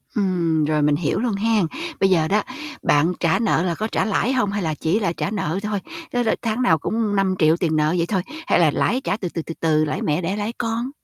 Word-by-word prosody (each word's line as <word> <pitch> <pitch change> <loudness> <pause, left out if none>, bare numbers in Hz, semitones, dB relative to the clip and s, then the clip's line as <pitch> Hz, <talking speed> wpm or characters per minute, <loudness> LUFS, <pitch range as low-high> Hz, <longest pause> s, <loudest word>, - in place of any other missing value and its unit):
Ừm, 170 -6 +1
rồi 150 0 +1
mình 145 0 +3
hiểu 150 0 -1
luôn 235 -1 0
hén. 215 -2 +2 0.3
Bây 195 - +4
giờ 165 -4 +3
đó, 205 +4 +2 0.4
bạn 155 +5 +3
trả 170 +5 +2
nợ 215 -7 +2
là 175 -2 -1
có 215 - -2
trả - - 0
lãi 225 +4 +1
hông, 250 -6 +1
hay 205 0 -2
là 160 -2 -1
chỉ 165 +8 0
là 195 -6 0
trả 195 - -3
nợ 190 -4 -2
thôi? 210 -1 -1 0.3
Tức 245 0 +1
là 225 - +1
tháng 230 +1 -1
nào 165 -10 +4
cũng 215 +6 -1
5.000.000 185 -5 +2
tiền 165 -3 0
nợ 155 +1 +2
vậy 170 - +1
thôi, 190 -2 0 0.3
hay - - +3
là 160 -4 +4
lãi 255 - 0
trả 205 - -1
từ, 185 -5 -4
từ, 165 - -4
từ, 165 - -7
từ, 155 -1 +2
lãi 150 - -3
mẹ 150 +3 0
đẻ 185 +4 -2
lãi 210 +3 -3
con? 230 +3 -2
185 Hz, 255 wpm, -22 LUFS, 160-215 Hz, 0.4 s, Bây